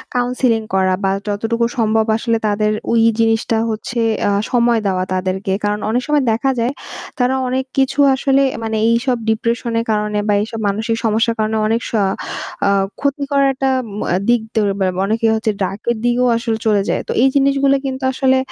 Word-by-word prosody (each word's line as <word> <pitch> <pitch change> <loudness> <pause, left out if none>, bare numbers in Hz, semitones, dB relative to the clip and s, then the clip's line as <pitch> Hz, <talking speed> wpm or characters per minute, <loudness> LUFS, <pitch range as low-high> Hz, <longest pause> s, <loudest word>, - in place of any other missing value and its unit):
counseling 245 -2 +1
করা 190 -1 +2
বা 195 - +2 0.2
যতটুকু 225 +3 -1
সম্ভব 220 -1 +2
আসলে 230 0 0
তাদের 210 +1 +1 0.2
ওই 230 -1 +3 0.2
জিনিসটা 225 0 +1
হচ্ছে 225 +2 -4 0.3
আ - - +1 0.2
সময় 240 -2 +3
দেওয়া 185 -1 0
তাদেরকে। 185 +1 -2
কারণ 210 0 0
অনেক 245 +3 +1
সময় 295 -2 +2
দেখা 230 +5 +1
যায় 235 +3 0 0.5
তারা 250 +2 +2
অনেক 260 +1 -1
কিছু 270 +1 +1 0.2
আসলে 270 +1 +2 0.2
মানে 220 -1 -2
এইসব 240 +2 +1
depression 230 +1 -1
এর 230 - -2
কারণে 210 -1 0
বা 205 - +3
এইসব 225 +1 -5
মানসিক 220 +3 -1
সমস্যার 225 +1 +1
কারণে 215 0 0
অনেক 225 +2 0
স - - -12 0.8
আ - - +3 0.3
ক্ষতি 280 0 -1
করাটা 270 -1 +2 0.3
ম - - -4 0.3
দিক 240 -1 +4
দের 215 -2 +2
বা 190 - +1 0.2
অনেকে 225 +2 0
হচ্ছে 220 0 0
drug 195 +2 -4
এর 235 - -2
দিকেও 245 +1 +2
আসলে 230 -1 -2
চলে 210 -2 +3
যায়। - - 0
তো - - -3
এই 270 - +5
জিনিসগুলো 275 0 +3
কিন্তু 265 0 -4
আসলে 260 0 +2
230 Hz, 180 wpm, -17 LUFS, 215-255 Hz, 0.8 s, এই